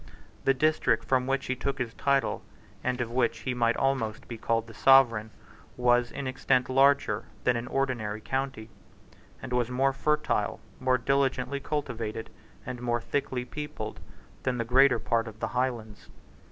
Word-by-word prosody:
The 135 - +4
district 135 -5 +2
from 130 -1 +1
which 135 0 0
he 130 - -1
took 140 +2 -3
his 120 -3 -3
title, 140 +1 +1 0.4
and 125 0 -1
of 115 -1 -3
which 120 -1 0
he 130 - -2
might 115 -1 +1
almost 120 -5 -1
be 120 - -6
called 115 0 0
the 115 - -12
sovereign, 115 -2 +5 0.5
was 120 -1 +3
in 140 - -5
extent 130 0 +1
larger 135 -5 +3 0.2
than 125 - +3
an 115 +1 -3
ordinary 120 -6 -1
county, 130 -2 -3 0.7
and 125 - -5
was 125 -1 +1
more 135 +2 +2
fertile, 150 +3 0 0.2
more 130 0 +2
diligently 135 +1 0
cultivated, 120 -7 -4 0.3
and 125 -1 -6
more 120 -1 0
thickly 125 0 -2
peopled 150 -6 -6 0.4
than 130 -1 -1
the 115 - -1
greater 130 +2 +5
part 115 0 0
of 110 -1 -10
the - - -2
Highlands. 120 -5 -3
125 Hz, 160 wpm, -28 LUFS, 115-135 Hz, 0.7 s, sovereign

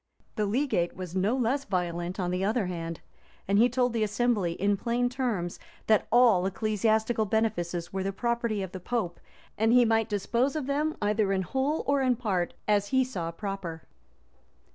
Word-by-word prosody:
[*] - - -39
The 210 -2 0
legate 215 -6 0
was 185 -1 -7
no 200 +7 +1
less 260 +3 0
violent 175 -1 -2
on 180 -1 -1
the 180 +1 -1
other 215 +1 +1
hand; 165 -2 -5 0.5
and 200 +1 +3
he 240 +2 +5
told 250 0 +1
the 230 - 0
assembly, 210 -4 +1
in 200 +3 +1
plain 240 +4 0
terms, 235 -9 -2 0.3
that 215 -2 +3
all 235 -7 +5
ecclesiastical 220 +2 +1
benefices 185 -6 -1
were 190 - -1
the 195 +1 -1
property 235 -1 -1
of 190 - -6
the 185 - -6
pope, 185 -3 -3 0.4
and 220 +1 +3
he 245 0 +6
might 225 -1 +2
dispose 235 +7 0
of 305 -4 -2
them, 295 +3 -1
either 210 -1 +1
in 190 -1 +1
whole 270 - -1
or 280 0 +2
in 255 -2 +3
part, 195 -7 -1
as 205 -1 +2
he 260 +3 +3
saw 185 -10 -4
proper. 175 -2 -5
215 Hz, 185 wpm, -28 LUFS, 185-245 Hz, 0.5 s, he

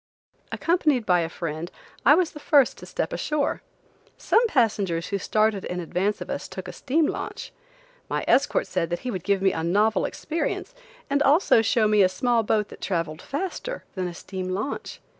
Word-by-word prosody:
Accompanied 305 -8 +1
by 180 -2 +4
a 165 -1 -1
friend, 165 0 -5 0.4
I 290 - +9
was 350 -1 +1
the 300 - -10
first 285 -3 +3
to - - -10
step - - -3
ashore. 300 -1 -1 0.6
Some 470 +1 +3
passengers 200 - +1
who 200 - -1
started 215 0 +1
in 180 - -4
advance 185 +4 -1
of - - -6
us, - - -4
took - - -8
a - - -7
steam 305 +4 +1
launch. - - -5 0.6
My - - -2
escort - - +3
said 170 -3 -2
that 175 - -3
he 250 - -3
would 185 -5 -4
give 195 0 +1
me 190 - +4
a 160 - -3
novel 205 +4 +2
experience, 325 +2 -3 0.3
and 285 0 +1
also 285 - +5
show 220 0 +2
me 210 -1 +4
a 185 - +5
small 235 +5 +1
boat 210 -1 0
that - - -12
traveled 165 -4 -2
faster 380 - -4
than 185 -2 -2
a 175 - -7
steam 185 0 -6
launch. 205 +9 -4
210 Hz, 190 wpm, -25 LUFS, 185-285 Hz, 0.6 s, I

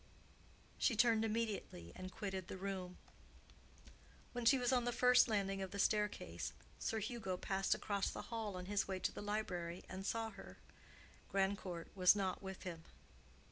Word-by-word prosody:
She 240 - +3
turned 225 -1 +5
immediately, 215 - -2
and 185 0 -6
quitted 190 -4 -4
the - - -5
room. 185 -2 -4 1.4
When 245 -1 -3
she 270 +4 +7
was 250 0 +2
on 245 -2 +3
the 245 - +1
first 250 +1 +6
landing 195 -3 0
of 190 - -3
the 200 - -6
staircase, 190 - 0 0.3
Sir 225 - -1
Hugo 220 -4 -2
passed 195 +1 +1
across 200 -2 0
the - - -5
hall 215 -4 -2
on 180 - -5
his 205 +1 0
way 190 -1 -1
to - - 0
the - - -7
library, 185 -5 -2
and 190 +1 -6
saw 225 +2 -1
her. 195 - -11 0.7
Grandcourt 190 -3 -1
was 185 +1 +7
not 190 -3 -1
with 190 -1 -6
him. 170 -3 -5
195 Hz, 165 wpm, -39 LUFS, 185-220 Hz, 1.4 s, she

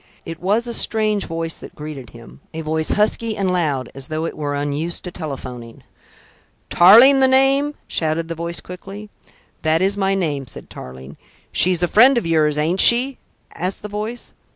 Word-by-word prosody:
It 165 0 -7
was 210 +6 0
a 240 - -4
strange 215 -3 0
voice 165 0 -5
that - - -12
greeted 150 -5 -8
him, 115 +3 -15
a 160 - -4
voice 155 0 -1
husky 215 +1 0
and 190 -2 0
loud, 145 -8 -1
as 135 0 -8
though 155 +1 -3
it - - -5
were 145 -1 -3
unused 145 +4 -3
to 180 - -7
telephoning. 130 -8 -8 0.9
"Tarling 235 +10 +7
the 265 - +5
name?" 270 +2 +3
shouted 160 +1 -1
the 165 - -4
voice 170 +1 -5
quickly. 195 +3 -10 0.5
"That 160 0 +1
is 195 +2 +1
my 195 -1 +1
name," 145 -8 -2
said - - -9
Tarling. 65 +2 -11 0.3
"She's 180 -1 +2
a - - +3
friend 245 +8 +5
of 235 - -1
yours, 155 -2 +1
ain't 165 +5 +1
she?" 250 +3 +4 0.3
asked 185 +4 -4
the 210 - -6
voice. 215 +4 -6
170 Hz, 175 wpm, -19 LUFS, 155-210 Hz, 0.9 s, Tarling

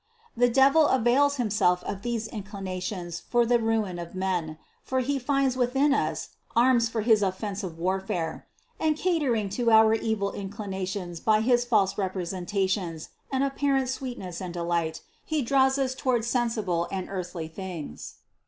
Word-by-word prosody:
The 245 +1 +4
devil 275 +5 +5
avails 260 +3 +3
himself 205 -7 +1
of 200 -1 -5
these 235 -1 -2
inclinations 190 -4 -5
for 240 -1 +1
the 240 +1 +3
ruin 220 -5 0
of 170 +1 -8
men, 180 -5 -2 0.2
for 260 0 -1
he 275 +2 -1
finds 270 0 +1
within 265 +3 +2
us - - -1 0.3
arms 235 -1 +4
for 225 -1 -2
his 220 -1 +4
offensive 190 -2 -3
warfare; 180 -2 -2 0.3
and 310 -1 +1
catering 290 - +1
to 235 +4 0
our 220 0 +6
evil 220 -3 0
inclinations 190 -3 -5
by 215 +2 +3
his 240 +1 +3
false 200 -5 +3
repre 185 -1 -2
sentations 185 -2 -2 0.2
and 265 0 +1
apparent 275 -1 +1
sweetness 245 -10 -5
and 180 -1 -5
delight, 170 -2 -1 0.2
he 310 -3 -1
draws 265 +2 +3
us 265 -1 0
toward 255 -3 0
sensible 225 -8 0
and 190 -2 -3
earthly 180 -4 -5
things. 165 - -7
215 Hz, 150 wpm, -27 LUFS, 185-250 Hz, 0.3 s, our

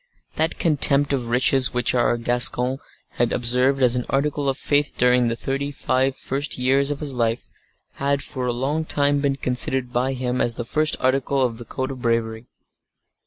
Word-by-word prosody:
That 160 +1 -1
contempt 145 -3 +2
of 125 -4 -2
riches 130 +2 +3
which 125 -1 +2
our 120 -1 +1
Gascon 125 +2 0 0.3
had 120 -1 -1
observed 125 +3 +1
as 125 -1 +5
an 125 - -3
article 140 0 -1
of 135 - -2
faith 145 -1 0
during 125 0 +3
the 115 - -1
thirty 135 +3 -3
five 130 0 -1
first 140 +2 -1
years 135 +2 +1
of 145 0 -4
his 145 -3 -2
life, 115 -1 -2 0.4
had 140 0 -2
for 130 -3 -4
a - - 0
long 135 +6 -2
time 145 -2 +1
been 140 -1 0
considered 125 -1 +1
by 130 +2 0
him 125 -1 -3
as 115 - -1
the 120 - -5
first 155 +5 0
article 135 +1 0
of 115 -1 -5
the 120 - -9
code 130 +2 -4
of 130 -2 -9
bravery. 115 -1 -2
130 Hz, 185 wpm, -21 LUFS, 125-140 Hz, 0.4 s, as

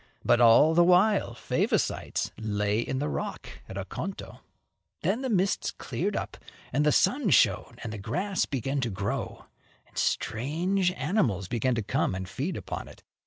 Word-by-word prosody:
But 120 - +4
all 120 +7 +7
the 175 +1 +6
while 185 +4 +3
Favosites - - -1
lay 105 -1 0
in 130 +2 -2
the 145 +3 -1
rock - - -4 0.2
at 95 - -7
Oconto. 130 - -6 0.6
Then 245 - +1
the 260 - -2
mists 195 -3 +1
cleared - - -3
up - - -4 0.4
and 145 +4 +2
the 150 - +4
sun 215 - +2
shone 135 - +3
and 110 -2 -5
the 105 - -6
grass 180 - -1
began 135 +1 -2
to 120 - -1
grow, 100 0 -4 0.4
and - - -27
strange 175 - 0
animals 140 - 0
began 120 +4 0
to 115 - -1
come 95 - 0
and 95 0 -5
feed - - -3
upon - - -6
it. - - -15
135 Hz, 165 wpm, -28 LUFS, 110-185 Hz, 0.6 s, all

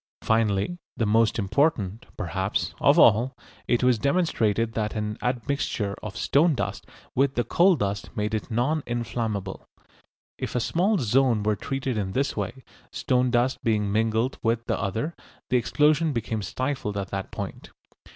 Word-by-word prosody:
Finally, 110 - +1 0.2
the 115 - +1
most 110 +1 +3
important, 110 - 0
perhaps, 95 0 -2
of - - +5
all, 125 +5 +5 0.3
it 120 0 +2
was 125 -3 +4
demonstrated 115 - +1
that 110 -1 -2
an 105 0 -2
admixture 120 -4 -1
of 110 - -7
stone 155 +2 +3
dust 100 -4 -4 0.3
with 135 +1 +2
the 120 - +1
coal 180 +7 +4
dust 100 -6 -2
made 105 +1 -1
it 110 - -2
non 125 +7 +1
inflammable. 115 -4 -3 0.8
If - - -4
a - - +3
small 180 - +1
zone 125 - +2
were 105 0 +2
treated 130 0 -3
in 95 -2 -3
this 140 +4 0
way, 110 +6 -4 0.3
stone 125 -1 +1
dust 125 +1 +1
being 105 -3 +1
mingled 110 +4 0
with 115 0 0
the - - -1
other, 110 - -2 0.4
the 125 - +5
explosion 150 +5 +2
became 115 -2 -2
stifled 130 0 -3
at 100 -1 -3
that 95 -1 -4
point. - - -7
115 Hz, 155 wpm, -25 LUFS, 105-130 Hz, 0.8 s, of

